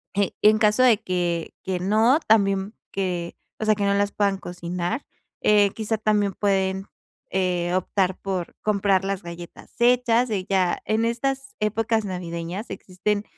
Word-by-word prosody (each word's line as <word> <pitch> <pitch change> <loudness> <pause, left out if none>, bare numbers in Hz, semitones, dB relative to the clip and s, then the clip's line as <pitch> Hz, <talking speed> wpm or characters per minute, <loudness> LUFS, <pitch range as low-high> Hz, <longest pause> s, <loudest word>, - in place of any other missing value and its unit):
je 200 -1 +1
en 215 +1 +6
caso 210 +3 +4
de 240 -5 +6
que 175 -4 -2
que 185 -1 -2
no 220 +9 +4
también 195 -1 +2 0.2
que, 180 -3 -3 0.3
o - - 0
sea 215 0 +4
que 205 - -2
no 200 - +2
las 200 0 +1
puedan 200 -2 +1
cocinar, 175 +6 -4 0.4
eh, 205 -1 +4
quizá 220 0 -1
también 210 -2 +1
pueden, 190 -1 0 0.5
eh, 180 -2 0
optar 185 0 0
por 185 -3 -4
comprar 200 -2 +2
las 195 0 -2
galletas 170 0 -10
hechas. 245 0 +3
Eh, 195 -4 -2
ya 185 -2 +1
en 220 +1 +1
estas 270 +3 -2
épocas 220 +1 0
navideñas 180 +2 -5
existen, 200 +2 -2
200 Hz, 155 wpm, -24 LUFS, 185-215 Hz, 0.5 s, en